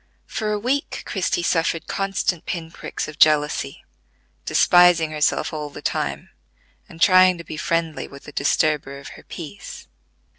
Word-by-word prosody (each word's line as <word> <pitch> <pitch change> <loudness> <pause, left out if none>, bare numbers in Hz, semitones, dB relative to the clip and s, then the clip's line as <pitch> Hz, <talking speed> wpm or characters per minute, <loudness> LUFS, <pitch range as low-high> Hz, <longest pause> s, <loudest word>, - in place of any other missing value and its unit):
For 215 -2 -3
a 210 - 0
week 255 +7 -2
Christie 180 -3 -1
suffered 165 -1 0
constant 195 -3 -2
pin 165 -2 -4
pricks - - -5
of 155 +1 -10
jealousy, 150 -2 +2 0.6
despising 175 -3 +5
herself 150 0 0
all 150 -1 -4
the - - -11
time, - - -3 0.6
and 165 - -13
trying 185 0 +6
to 170 - -8
be 155 - -8
friendly 165 0 -2
with 140 0 -13
the 150 - -10
disturber 145 0 0
of 140 - -10
her - - -12
peace. 170 +4 -9
165 Hz, 150 wpm, -22 LUFS, 150-180 Hz, 0.6 s, trying